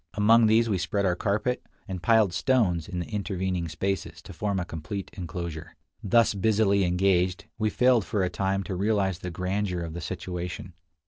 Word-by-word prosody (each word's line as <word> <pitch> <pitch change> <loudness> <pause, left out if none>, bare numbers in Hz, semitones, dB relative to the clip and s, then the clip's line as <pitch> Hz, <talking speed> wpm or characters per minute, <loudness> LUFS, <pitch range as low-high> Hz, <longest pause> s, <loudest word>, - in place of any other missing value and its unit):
Among 110 +2 +5
these 115 +2 +4
we 100 -4 0
spread 100 +4 -1
our 90 -2 +2
carpet, 105 +7 -1 0.2
and 95 -3 -5
piled 110 -3 +4
stones 95 - +1
in 95 -3 -5
the 85 - -2
intervening 95 -4 -2
spaces 95 +4 -3
to - - -10
form 100 -2 -1
a 90 - -2
complete 85 +5 -6
inclosure. 85 -3 -6 0.3
Thus 115 +2 +4
busily 100 -1 +2
engaged, 90 0 +1
we 110 0 +2
failed 125 -1 +3
for 100 0 -1
a - - +2
time 95 +2 -1
to 95 - -4
realize 95 -2 0
the 90 - -5
grandeur 90 +1 -2
of 85 -1 -5
the 85 - -6
situation. 90 +1 -5
95 Hz, 180 wpm, -27 LUFS, 90-105 Hz, 0.3 s, Among